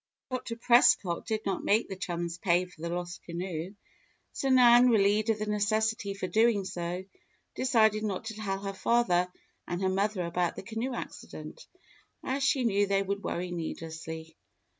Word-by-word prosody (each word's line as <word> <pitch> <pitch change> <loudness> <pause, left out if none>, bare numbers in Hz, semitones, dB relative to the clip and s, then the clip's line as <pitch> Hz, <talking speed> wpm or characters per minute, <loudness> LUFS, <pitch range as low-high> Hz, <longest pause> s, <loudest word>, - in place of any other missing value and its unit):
Dr. 250 -2 -3
Prescott 230 -7 +4
did 220 -1 -2
not 195 -1 -1
make 215 +3 +2
the 190 - -5
chums 175 -2 -4
pay 175 0 +2
for 180 -3 -17
the 170 - -3
lost 175 0 -4
canoe, 175 +1 -5 0.6
so 270 - -2
Nan, 250 -1 +7
relieved 210 0 +3
of 220 - +2
the 215 - -3
necessity 210 0 0
for 195 - -4
doing 220 0 +2
so, 175 0 -4 0.5
decided 220 -4 +3
not 205 -1 -3
to 220 - -4
tell 205 -3 -3
her 195 0 -4
father 185 -5 +2 0.4
and 175 - -3 0.2
mother 200 -2 0
about 175 +1 -1
the - - -7
canoe 230 +5 -3
accident, - - -8 0.6
as 270 +2 -2
she 265 -1 +2
knew 205 -3 +2
they 195 0 +2
would 200 +1 -3
worry 180 +1 -3
needlessly. 160 -1 -6
200 Hz, 160 wpm, -29 LUFS, 175-225 Hz, 0.6 s, Nan